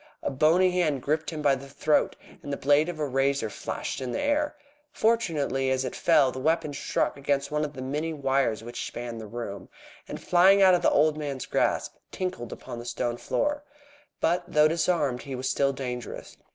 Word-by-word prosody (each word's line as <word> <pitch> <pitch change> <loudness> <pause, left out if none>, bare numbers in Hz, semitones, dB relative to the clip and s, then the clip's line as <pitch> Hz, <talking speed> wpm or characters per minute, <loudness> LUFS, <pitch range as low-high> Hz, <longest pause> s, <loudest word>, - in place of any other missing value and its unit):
A - - -1
bony 165 +7 +4
hand 155 -7 0
gripped 155 +2 0
him 155 -2 -5
by 140 -2 +5
the 135 +1 -5
throat, 150 +2 +1 0.3
and 145 - -7
the 140 - -2
blade 145 +4 +3
of 175 - -5
a 150 - -1
razor 135 -3 0
flashed - - -5
in 130 -1 -3
the - - -2
air. 290 +1 0 0.4
Fortunately, 155 - +1
as 130 0 0
it 125 - -4
fell, 150 -6 +4
the 130 - -6
weapon 160 +1 0
struck 140 - -1
against 140 0 -1
one 150 0 0
of 150 -1 -4
the 130 - -7
many 150 +5 -2
wires 135 -6 0
which 120 +1 -5
spanned 120 -1 -6
the 110 - -8
room, 100 -4 -6 0.4
and - - -6
flying 185 +3 +5
out 190 -1 +7
of 180 - +3
the - - +4
old 155 +1 +3
man's 140 -4 -4
grasp, - - 0 0.2
tinkled 180 -11 -4
upon 120 - -8
the - - -7
stone 120 0 -2
floor. 295 - -1 0.6
But, 175 +2 +1
though 150 0 +4
disarmed, 155 -5 0
he 135 -2 -6
was 130 +1 -3
still 140 0 +2
dangerous. 125 -2 -6
140 Hz, 200 wpm, -27 LUFS, 130-160 Hz, 0.6 s, out